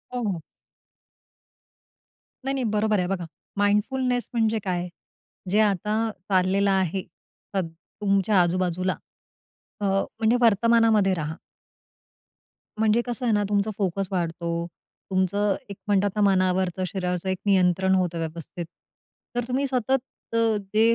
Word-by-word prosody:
हो, 245 - -1
हो. 175 -4 -3 2.0
नाही, 270 - 0
नाही, 265 - -1
बरोबर 215 -1 +2
आहे. 180 - 0
बघा, 180 -2 -2 0.3
माइंडफुलनेस 245 +5 +1
म्हणजे 225 -1 +2
काय? 180 -2 -1 0.6
जे 205 +3 +3
आता 215 +2 +1 0.2
चाललेलं 195 +1 +3
आहे 190 -1 +1 0.5
तद 185 -4 +1 0.3
तुमच्या 195 -1 +3
आजूबाजूला, 180 +1 0 0.9
अ, - - 0 0.3
म्हणजे 225 +1 +3
वर्तमानामध्ये 225 -2 +4
राहा. 160 -2 -3 1.4
म्हणजे 220 +1 +3
कसं 245 0 -2
आहे 230 - +3
ना, 205 0 +2
तुमचा 205 +1 +1
फोकस 195 -1 -1
वाढतो. 170 -1 -2 0.4
तुमचं 195 +2 +2
एक 200 - -6
म्हणतात 205 -1 +3
ना, 210 - +1
मनावरचं, 185 -2 +2
शरीरावरचं 180 -1 -2
एक 185 - 0
नियंत्रण 190 -1 +3
होतं 180 -2 0
व्यवस्थित. 165 +1 -5 0.7
तर 245 - 0
तुम्ही 260 +2 0
सतत 260 0 +1 0.3
अ, - - +2 0.4
ते 215 - +4
195 Hz, 125 wpm, -25 LUFS, 180-220 Hz, 2.0 s, वर्तमानामध्ये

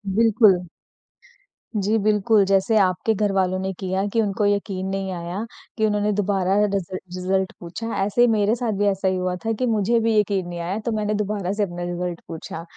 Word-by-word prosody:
बिल्कुल। 220 -3 +5 1.3
जी, 215 +3 +2
बिल्कुल 210 0 +3
जैसे 195 +3 +2
आपके 190 +2 +2
घरवालों 195 -3 +1
ने 190 0 -2
किया 190 0 -1
कि 230 - +3
उनको 205 -1 0
यक़ीन 200 -2 -1
नहीं 195 0 -3
आया 175 +3 -4 0.3
कि 220 - +2
उन्होंने 210 0 +1
दोबारा 195 -2 +1
रिज़ 200 -3 -1
रिज़ल्ट 185 +1 -2
पूछा 175 +6 -6 0.2
ऐसे 205 +4 +1
ही 245 - +7
मेरे 215 -1 +2
साथ 240 -2 -2
भी 205 - +2
ऐसा 195 -1 0
ही 185 - +2
हुआ 180 0 -1
था 225 - +1
कि 255 - +1
मुझे 225 +1 +2
भी 225 0 +1
यक़ीन 195 -3 0
नहीं 175 0 -6
आया 175 +4 -2
तो 235 - 0
मैंने 215 -1 -1
दोबारा 205 -3 -2
से 210 0 0
अपना 175 -2 -4
रिज़ल्ट 175 0 -3
पूछा। 165 0 -7
195 Hz, 195 wpm, -23 LUFS, 185-215 Hz, 1.3 s, ही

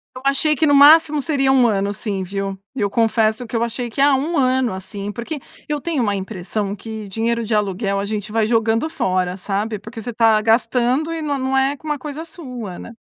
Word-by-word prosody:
Eu 255 - -7
achei 290 +3 +3
que 310 +2 +1
no 285 - +4
máximo 300 +1 +7
seria 270 -3 +1
1 260 -2 +5
ano 200 -2 +1
assim, 200 -1 -3
viu. 195 +1 -4 0.2
Eu 205 -6 -1
confesso 225 +1 +1
que 230 - -4
eu 230 - 0
achei 235 +1 -4
que, 235 - -14
ah, 280 0 +5
1 305 +6 -1
ano 255 -5 +2
assim, 200 +2 -6
porque 245 +7 -5 0.3
eu 295 -1 -2
tenho 315 -5 -1
uma 205 -3 0
impressão 195 +1 -4
que 220 -1 -7
dinheiro 230 +3 -1
de 220 - 0
aluguel, 200 -1 0
a 200 - -1
gente 210 0 -4
vai 225 0 +1
jogando 225 +5 +1
fora, 185 - -1
sabe. 205 +3 -2
Porque 220 +2 -9
você 240 - -4
está 225 -1 +4
gastando 250 +6 +2
e 325 -1 -4
não 285 -2 -1
não 265 0 -1
é 270 +2 +2
uma 300 -2 -2
coisa 300 +3 -6
sua, 250 - -7
né? 230 - -9
230 Hz, 215 wpm, -20 LUFS, 205-275 Hz, 0.3 s, máximo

